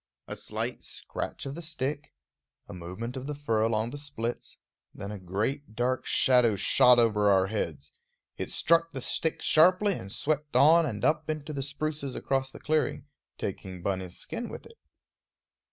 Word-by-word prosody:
A - - -5
slight - - -4
scratch - - -5
of 135 - -4
the 170 - -7
stick, 150 -2 -3 0.6
a - - -9
movement 90 +8 -6
of 130 +1 -6
the 150 - -3
fur 115 -7 0
along 110 +1 +1
the 145 - -5
splits, 120 -5 -5 0.4
then 100 - -6
a 105 - -6
great 110 +8 -3
dark 125 +2 -1
shadow 125 -4 +4
shot 125 +5 +6
over 105 -3 +4
our 95 -1 +4
heads. 80 -9 -4 0.4
It - - -4
struck 165 0 +3
the 135 - -4
stick 160 +5 -1
sharply 185 +6 +5
and 95 - -7
swept 145 +4 -2
on 155 +5 +6
and 105 -6 -3
up 155 0 +1
into 155 0 -3
the 140 - -3
spruces 140 0 -3
across 135 -1 -1
the - - -12
clearing, 155 -2 0 0.3
taking 95 -2 -6
Bunny's 95 -2 -3
skin 235 - -5
with - - -9
it. 460 - -16
130 Hz, 170 wpm, -28 LUFS, 105-150 Hz, 0.6 s, shot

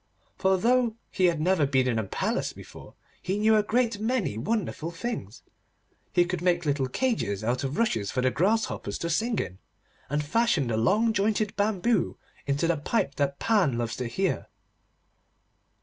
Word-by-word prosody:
For 190 0 +2
though 240 +2 +2 0.2
he 185 - +2
had 170 -3 +2
never 165 -2 +2
been 130 -2 +2
in 115 -3 +1
a - - -1
palace 95 - -2
before, - - -13 0.3
he 190 +2 -1
knew 220 +1 +4
a 215 - +5
great 230 0 0
many 225 - 0
wonderful 170 - -2
things. 170 - -5 0.7
He 175 - +4
could 175 -1 -3
make 175 -1 +1
little 140 -2 +1
cages 125 - -1
out 120 +4 0
of 135 +1 -3
rushes 115 - +1
for 125 - -1
the 130 0 +2
grasshoppers 185 - 0
to 170 - -3
sing 225 +7 0
in, 95 - -4 0.5
and 150 +1 -1
fashion 225 - +2
the 110 - 0
long 210 - +3
jointed 210 +1 0
bamboo 210 0 +1 0.3
into 140 +3 +1
the 170 -1 +1
pipe 145 0 0
that 140 -1 0
Pan 185 - +2
loves 115 -1 -2
to 125 - -3
hear. 190 +10 -1
175 Hz, 170 wpm, -27 LUFS, 135-220 Hz, 0.7 s, a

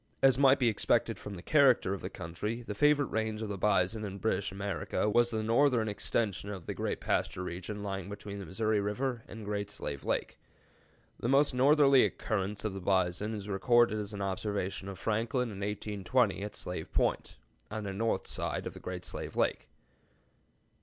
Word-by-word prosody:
As 135 -2 +7
might 135 0 +6
be 125 - +2
expected 110 -3 +1
from 105 - -7
the 85 - -9
character 135 -10 +4
of 100 - -5
the - - -4
country, 105 +8 -5
the 105 - -5
favorite 145 +5 +3
range 110 -1 -1
of 110 - -4
the 100 - -3
bison 105 +1 +2
in 100 -2 -5
British 100 -2 -1
America 100 +1 -2
was 120 +3 +4
the 110 -2 -1
northern 115 0 +3
extension 105 -2 -1
of 95 -5 -6
the - - -3
great - - -2
pasture 90 - -1
region 95 +4 -5
lying 95 -2 -4
between 100 0 -7
the 100 - -6
Missouri 110 +4 +1
River 120 +4 -2
and 110 -1 -9
Great 100 0 -2
Slave 70 -8 -4
Lake. - - -2 0.8
The 120 - -1
most 140 +1 +4
northerly 140 +1 +6
occurrence 105 -1 -2
of 105 - -1
the 95 - -6
bison 95 +3 +1
is 100 -1 -6
recorded 110 +2 +3
as 105 0 -4
an 100 -1 -4
observation 100 0 -2
of 95 - -7
Franklin 115 +5 0
in 100 -3 -7
1820 105 +2 0
at 105 +1 -5
Slave 90 -3 -5
Point, - - 0 0.3
on 110 0 -4
the 100 -1 -4
north 115 +3 0
side - - -2
of - - -7
Great - - -5
Slave - - -6
Lake. - - 0
105 Hz, 185 wpm, -31 LUFS, 100-115 Hz, 0.8 s, As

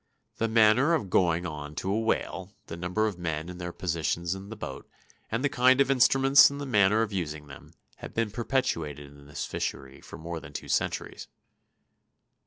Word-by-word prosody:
The 115 - 0
manner 115 +8 +4
of 100 - -4
going 85 -2 +2
on 75 -2 -6
to 95 - -2
a 105 - +1
whale, 105 -3 -2
the 85 - -7
number 90 +5 -1
of 100 -5 -3
men 80 -1 -3
and 90 0 -8
their 85 0 -4
positions 85 0 -2
in 95 +1 -9
the 110 - -7
boat, 75 -10 -8 0.4
and 115 +4 -1
the - - +4
kind 130 -1 +4
of 135 -1 +4
instruments 135 +1 +6
and 140 0 -7
the 145 - -4
manner 105 -3 +3
of 105 -2 -5
using 75 -5 -4
them, 70 -1 -14 0.2
have - - -10
been 115 -2 0
perpetuated 80 - -2
in 70 0 -16
this 75 - -5
fishery 65 0 -5
for - - -11
more 85 +1 -6
than - - -12
two - - -7
centuries. - - -2
95 Hz, 195 wpm, -28 LUFS, 80-115 Hz, 0.4 s, instruments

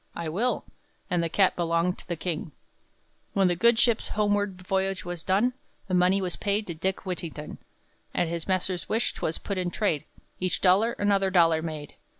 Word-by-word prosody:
"I 170 -2 -3
will!" 225 +10 0 0.5
and 175 -1 +2
the 165 - -1
cat 190 +2 +3
belonged 170 +1 0
to - - -15
the 175 - -2
king. 165 -2 -4 0.8
When 195 -1 +4
the 175 - +1
good 235 +6 +4
ship's 235 -1 +3
homeward 205 -3 0
voyage 190 0 -1
was 175 -1 -4
done, 205 +9 +2 0.3
The 185 - -4
money 185 +2 +4
was 180 -2 -2
paid 205 +1 0
to 170 - -4
Dick 190 +5 -2
Whittington; 170 -5 -5 0.6
At 175 - +2
his 170 0 -4
master's 185 -1 0
wish 225 +2 +1
'twas 160 - -2
put 200 -2 -3
in 180 -1 -1
trade; 175 -6 0 0.3
Each 180 -2 0
dollar 200 +5 +4
another 200 -4 +2
dollar 165 -3 +4
made. 155 -3 -6
185 Hz, 180 wpm, -27 LUFS, 170-200 Hz, 0.8 s, When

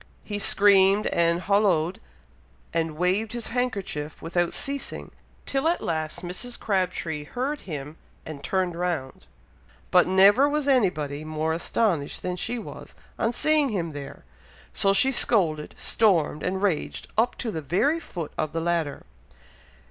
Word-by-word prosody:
He 205 -1 -4
screamed 200 0 +5
and 170 0 +1
hollooed, 185 -4 +2 0.7
and 165 -2 -1
waved 190 +6 0
his 240 -1 -2
handkerchief, 200 -12 -3
without 175 +1 -1
ceasing, 280 0 -4 0.3
till 275 +3 0
at 340 - +2
last 155 0 -3
Mrs. 185 +8 -5
Crabtree 180 -6 -1
heard 270 - -3
him, 150 0 -6 0.3
and 150 -3 -8
turned 185 -2 0
round, 170 -7 -3 0.6
but 180 -1 +5
never 200 +9 +6
was 295 -1 -1
anybody 155 - +1
more 155 +1 -2
astonished 170 -2 -1
then 180 0 -2
she 235 +7 -3
was, 225 - -9 0.2
on 225 - +1
seeing 305 +2 +2
him 175 -7 -2
there, 145 - -9 0.5
so 195 - +2
she 200 +7 +4
scolded, 165 - +2
stormed, 170 -9 +2
and 190 +2 -2
raged, 185 -7 -1
up 230 +3 +2
to 230 - -3
the 160 - -4
very 190 - +1
foot 170 - -7
of 155 -1 -2
the 165 - -1
ladder. 165 -3 -2
180 Hz, 140 wpm, -25 LUFS, 160-225 Hz, 0.7 s, never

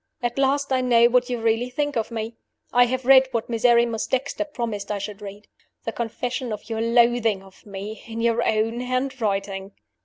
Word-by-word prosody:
"At 240 +2 -1
last 275 0 +1
I 260 - +2
know 235 -2 +5
what 250 +1 +2
you 245 -1 -2
really 225 +2 +1
think 290 +2 -2
of 225 -2 -1
me. 225 -1 -4 0.4
I 245 0 +6
have 255 +1 -3
read 265 0 +7
what 235 -1 -3
Miserrimus 235 -1 +2
Dexter 270 +4 -1
promised 230 -8 -4
I 205 - -1
should 200 +1 -6
read 205 +1 -9 0.4
the 225 - -1
confession 240 +2 -3
of 215 +2 -6
your 225 0 -1
loathing 230 -4 +2
for 205 - -20
me, 200 +2 -7
in 225 0 -6
your 230 0 +2
own 225 +2 0
handwriting. 210 -7 -2
235 Hz, 185 wpm, -23 LUFS, 220-250 Hz, 0.4 s, read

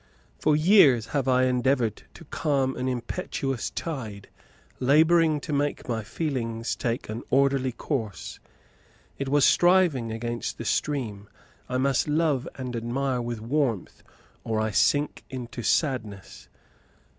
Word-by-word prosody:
For 150 - +3
years 155 - +5
have 140 -3 0
I 130 0 +4
endeavoured 125 -2 +1
to - - -12
calm 135 -3 0
an 130 - -3
impetuous 125 +1 -3
tide, 110 - -6 0.5
labouring 155 +3 +4
to 150 - -5
make 145 0 -1
my 115 -2 -1
feelings 115 -3 -3
take 120 0 -3
an 110 +2 -5
orderly 135 -1 +2
course. 115 - -4 0.8
It 140 -1 -2
was 145 0 +4
striving 175 -10 +3
against 120 +1 -4
the - - -6
stream. 110 -9 -2 0.4
I 125 - -1
must 135 +1 +1
love 150 -3 +1
and 125 -2 -5
admire 125 +2 -1
with 120 -2 -4
warmth, 120 - -1 0.4
or 110 -1 -1
I 110 0 0
sink 145 +8 +1
into 125 -2 -6
sadness. 105 - -2
130 Hz, 130 wpm, -26 LUFS, 115-145 Hz, 0.8 s, years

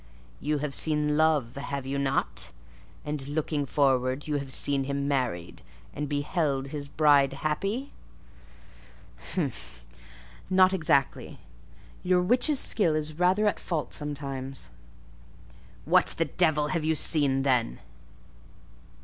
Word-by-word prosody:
"You 150 +1 -1
have 145 -1 -4
seen 150 -1 +1
love: 150 -6 +1
have 140 -1 -4
you 140 +1 -2
not?—and, 135 - -3
looking 145 -1 -2
forward, 130 0 +1
you 150 -1 0
have 140 -1 -6
seen 140 0 +1
him 140 0 -2
married, 125 -12 -2 0.3
and 145 0 -4
beheld 145 -2 -1
his 145 -1 -5
bride 140 -2 +3
happy?" 195 - -3 1.4
"Humph! 135 - -5 0.6
Not 185 0 +5
exactly. 155 -7 0 0.6
Your 180 0 +2
witch's 255 - +3
skill 170 -8 +2
is 155 +1 -4
rather 185 +4 +3
at 210 - +1
fault 160 -4 -4
sometimes." 140 -3 -5 1.1
"What - - +4
the 165 - +1
devil 150 -1 +1
have 170 -3 -1
you 160 +1 +1
seen, 140 -4 +4
then?" 125 - +1
145 Hz, 115 wpm, -27 LUFS, 135-160 Hz, 1.4 s, Not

